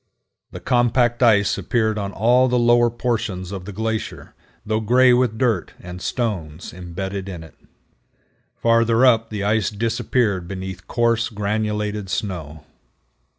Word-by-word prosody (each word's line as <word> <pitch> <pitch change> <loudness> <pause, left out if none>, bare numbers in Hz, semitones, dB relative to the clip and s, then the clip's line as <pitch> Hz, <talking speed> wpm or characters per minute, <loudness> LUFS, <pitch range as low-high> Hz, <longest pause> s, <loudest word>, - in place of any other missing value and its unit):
The - - -9
compact 120 -1 +1
ice 105 -5 +3
appeared 110 -3 0
on 100 -1 -4
all 120 +6 +3
the 125 0 +1
lower 120 0 +4
portions 115 -6 -3
of 95 -2 -6
the 105 - -7
glacier, 110 +2 -4 0.3
though 110 0 0
gray 125 +3 +4
with 120 -3 +1
dirt 115 -7 0
and 90 0 -9
stones 90 -11 -4
embedded 95 +2 -6
in 85 -4 -7
it. 80 - -15 1.0
Farther 115 +1 +3
up 115 -3 +3
the 105 -2 -4
ice 105 -1 +1
disappeared 110 -3 -1
beneath 95 -1 -7
coarse 115 -1 +1
granulated 105 -1 -2
snow. 80 -7 -4
110 Hz, 135 wpm, -21 LUFS, 95-120 Hz, 1.0 s, lower